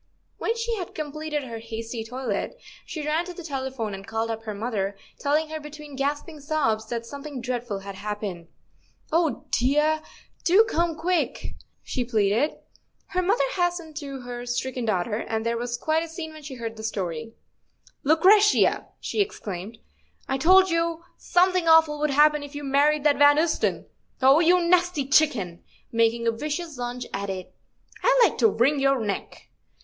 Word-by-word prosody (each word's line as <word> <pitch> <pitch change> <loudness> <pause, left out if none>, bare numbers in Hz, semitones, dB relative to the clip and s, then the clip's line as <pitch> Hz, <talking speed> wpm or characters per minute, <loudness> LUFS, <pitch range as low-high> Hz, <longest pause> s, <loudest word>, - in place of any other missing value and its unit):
When 455 +1 -1
she 460 0 -1
had 360 - -6
completed 305 0 -3
her 230 -3 -6
hasty 225 0 -5
toilet, 250 - -4 0.3
she 310 -3 -5
ran 310 +3 +1
to 360 0 -8
the 350 - -8
telephone 265 -7 -4
and 195 +1 -8
called 225 0 -2
up 225 0 -4
her 215 - -3
mother, 200 -3 -2 0.2
telling 305 +2 +1
her 315 0 -4
between 300 -1 -10
gasping 290 +3 -2
sobs 275 -8 0
that 235 0 -4
something 280 +1 -7
dreadful 240 -4 -3
had 200 0 -7
happened. 195 -3 -5 0.6
"Oh, 325 -1 +1
dear; 300 +5 +2 0.4
do 380 +6 +6
come 335 0 0
quick," 340 +2 -1 0.3
she 255 - -2
pleaded. 225 +4 +1 0.5
Her 365 -1 0
mother 395 +6 +2
hastened 350 -3 -1
to 275 -3 -6
her 245 0 -7
stricken 245 0 -2
daughter, 210 0 0
and 220 -1 -3
there 230 0 +1
was 240 +1 -3
quite 315 +5 +1
a 335 - -4
scene 320 -1 -7
when 310 - -11
she 280 -2 -8
heard 230 -2 -5
her - - -7
story. 220 +1 -4 0.3
" - - -32
Lucretia," 410 +6 +5
she 430 - -1
exclaimed, 210 - -4 0.3
" - - -36
I 270 0 -1
told 375 +4 +6
you 335 0 0 0.2
somthing 365 -1 +2
awful 320 -2 +5
would 300 0 +1
happen 300 +1 +4
if 285 0 -9
you 290 - -5
married 285 +2 +3
that 295 -2 +3
Van 290 0 +7
Ousten. 320 +1 +1 0.3
Oh, 270 +3 +6
you 350 +2 +5
nasty 355 -5 +3
chicken! 230 - +2 0.3
"—making 230 0 +2
a 230 - +3
vicious 300 +4 -4
lunge 245 0 -4
at 200 0 -3
it—" 185 -1 -6 0.5
I'd - - +4
like - - -6
to - - +6
wring 285 - +2
your 275 -1 +3
neck." 210 -3 -5
280 Hz, 175 wpm, -25 LUFS, 230-320 Hz, 0.6 s, Van